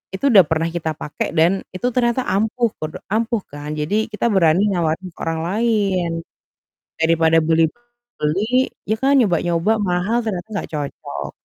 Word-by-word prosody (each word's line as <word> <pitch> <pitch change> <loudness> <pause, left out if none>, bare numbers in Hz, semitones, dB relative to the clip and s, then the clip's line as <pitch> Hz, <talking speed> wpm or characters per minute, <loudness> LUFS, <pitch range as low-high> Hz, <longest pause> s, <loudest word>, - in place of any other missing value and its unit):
itu 275 +6 +1
udah 195 -4 +8
pernah 160 +1 0
kita 160 -2 -3
pakai, 150 - -4
dan 175 +4 +3 0.2
itu 245 +7 -1
ternyata 245 +1 +1
ampuh, 220 +3 0
podo 155 0 -5 0.2
ampuh 225 0 0
kan. 145 +1 -7
Jadi, 200 +9 0
kita 225 +2 -1
berani 180 -1 +4
nawarin 175 +1 -1
ke - - -22
orang 165 0 -2
lain. 200 -3 +1 0.9
Daripada 165 0 +3
beli 160 0 +3 0.5
beli 215 +12 +1 0.2
ya, 215 - +1
kan, 270 +5 +3
nyoba-nyoba 185 +1 +1
mahal 190 +6 0
ternyata 205 -4 -3
nggak - - -4
cocok. 145 -3 -5
185 Hz, 150 wpm, -20 LUFS, 165-220 Hz, 0.9 s, udah